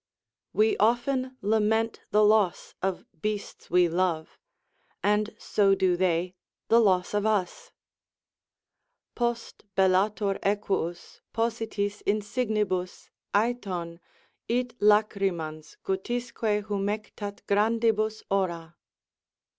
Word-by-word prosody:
'" - - -63
We 220 - +4
often 255 +3 +1
lament 220 +2 +1
the 210 0 +4
loss 210 -4 +2
of 190 -1 -2 0.2
beasts 210 -1 -4
we 180 0 +4
love, 170 -2 -1 0.6
and 210 +1 +1
so 195 -2 +2
do 185 -2 +2
they 180 0 0 0.4
the 230 - +6
loss 185 -5 +2
of 205 +1 +1
us: 215 - -1 1.4
Post, 240 -1 -3
bellator 195 +2 +2
equus, 195 -4 -2
positis 225 -3 -1
insignibus, 210 -3 -1 0.2
Æthon 195 -7 -1 0.5
It 245 +1 -1
lacrymans, 195 -7 +1
guttisque 210 +1 -1
humectât 205 0 -4
grandibus 220 +1 +1
ora. 170 -4 -1
205 Hz, 90 wpm, -27 LUFS, 185-220 Hz, 1.4 s, the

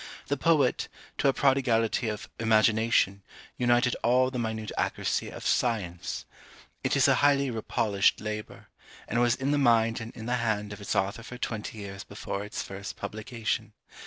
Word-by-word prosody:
The 140 - +2
poet, 145 -3 +2 0.3
to - - +3
a - - +6
prodigality 120 -5 +2
of 105 -1 -5
IMAGINATION, 110 -2 +3 0.4
united 120 0 +3
all 130 +1 +3
the 125 - -3
minute 110 -2 -3
accuracy - - -1
of - - -9
SCIENCE. 100 -8 -1 0.6
It - - +1
is - - +5
a - - +5
highly 140 -2 +4
repolished 110 -3 +1
labour, 105 0 -6 0.4
and 120 +2 +1
was 120 -1 +4
in 135 +2 -1
the 145 - +2
mind 115 -3 +3
and 115 +1 -6
in 110 - -8
the 125 +1 0
hand 105 -3 -1
of 105 - -10
its 100 - -2
author 100 +4 0
for 125 +2 -9
twenty 110 -3 -4
years 100 -1 -7
before 100 -1 -5
its 105 - -4
first 100 0 -7
publication. 110 +2 -3
115 Hz, 165 wpm, -28 LUFS, 105-125 Hz, 0.6 s, a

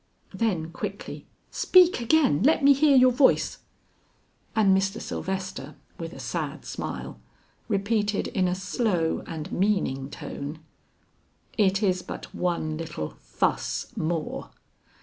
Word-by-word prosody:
Then 175 -8 -1
quickly, - - -6 0.2
"Speak 365 -4 +5
again; 240 - +3
let 300 +4 +4
me 280 0 +8
hear 280 0 +5
your 255 0 +7
voice." 260 +2 +3 1.0
And 200 -3 +5
Mr. 195 +3 0
Sylvester 190 -1 -4 0.2
with - - -5
a - - -10
sad - - -4
smile, - - -5 0.5
repeated 205 0 0
in 185 -2 +1
a 180 - 0
slow 185 -3 0
and 160 -1 -6
meaning 175 -9 0
tone, 145 +2 -6 1.0
"It 195 -1 +2
is 185 -2 +2
but - - -8
one 165 -3 -1
little 155 - -5
fuss - - -2
more!" 160 -1 -3
190 Hz, 120 wpm, -26 LUFS, 165-230 Hz, 1.0 s, me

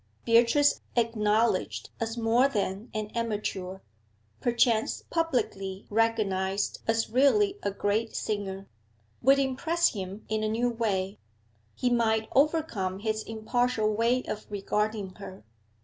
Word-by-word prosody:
Beatrice, 235 +5 +4
acknowledged 220 -3 +1
as 225 +1 -3
more 235 +3 +3
than 205 -2 -3
an 215 -1 -4
amateur, 205 -5 -3 0.6
perchance 235 -2 +1
publicly 210 - -1
recognised 205 -3 0
as 225 -1 +1
really 390 - +3
a - - 0
great 205 +3 -1
singer, 195 -2 -3 0.5
would 270 +3 +5
impress 315 +6 +1
him 195 0 -7
in 215 0 -1
a 215 - 0
new 240 +3 +1
way; 200 -4 -1 0.6
he 250 - 0
might 220 -2 +2
overcome 275 - +1
his 215 +1 -2
impartial 225 0 0
way 235 +4 +2
of 210 - -6
regarding 210 0 -2
her. 195 -1 -10
220 Hz, 115 wpm, -28 LUFS, 205-240 Hz, 0.6 s, would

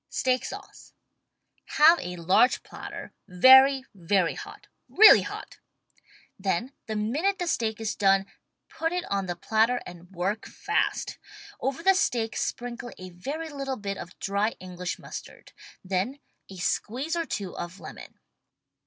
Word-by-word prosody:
STEAK 255 -1 0
SAUCE - - -10 0.8
Have 325 +3 +7
a 180 0 -5
large 185 +9 +3
platter - - -9
very, 265 +8 +7
very 185 -1 +1
hot - - -10 0.2
— - - -51
really 440 +2 +8
hot! - - -8 0.8
Then 195 +7 -1
the 220 - -3
minute 290 - 0
the 355 - -2
steak 225 -9 -1
is 220 -1 -2
done, 195 -1 +3 0.4
put 325 0 -2
it 360 0 -2
on 195 -1 0
the 175 - -3
platter 225 +7 +1
and 175 -1 -11
vi^ork 195 +4 -3
fast. - - -2 0.4
Over 270 +4 -3
the 385 +1 +6
steak 235 - 0
sprinkle 240 0 -4
a 185 0 -9
very 285 - -5
little 275 -2 -4
bit 200 -1 -4
of 175 - -10
dry 200 +3 -1
English 180 -1 -5
mustard. - - -10 0.3
Then 195 +8 -1 0.3
a 190 - -10
squeeze 255 - -2
or 335 -2 -2
two 195 -3 -4
of 175 +3 -7
lemon. - - -11
220 Hz, 145 wpm, -27 LUFS, 185-270 Hz, 0.8 s, really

